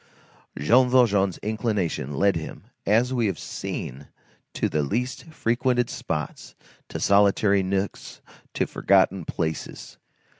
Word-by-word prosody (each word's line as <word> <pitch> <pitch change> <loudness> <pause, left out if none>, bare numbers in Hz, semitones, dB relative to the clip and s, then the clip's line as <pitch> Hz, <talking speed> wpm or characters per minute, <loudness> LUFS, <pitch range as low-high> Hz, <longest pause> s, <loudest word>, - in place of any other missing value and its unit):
Jean 125 - +4
Valjean's 105 -7 +3
inclination 105 - -2
led 100 +5 +3
him, 80 -1 -6 0.2
as 115 +5 +3
we 120 -3 +1
have 95 - -2
seen, 70 +3 -6 0.4
to - - -1
the 75 - 0
least 120 - -2
frequented 125 -5 0
spots, 75 -2 -5 0.3
to - - -5
solitary 100 0 +4
nooks, 95 +1 -3 0.4
to - - +1
forgotten 95 -2 +2
places. 80 -2 -4
100 Hz, 115 wpm, -25 LUFS, 90-120 Hz, 0.4 s, Jean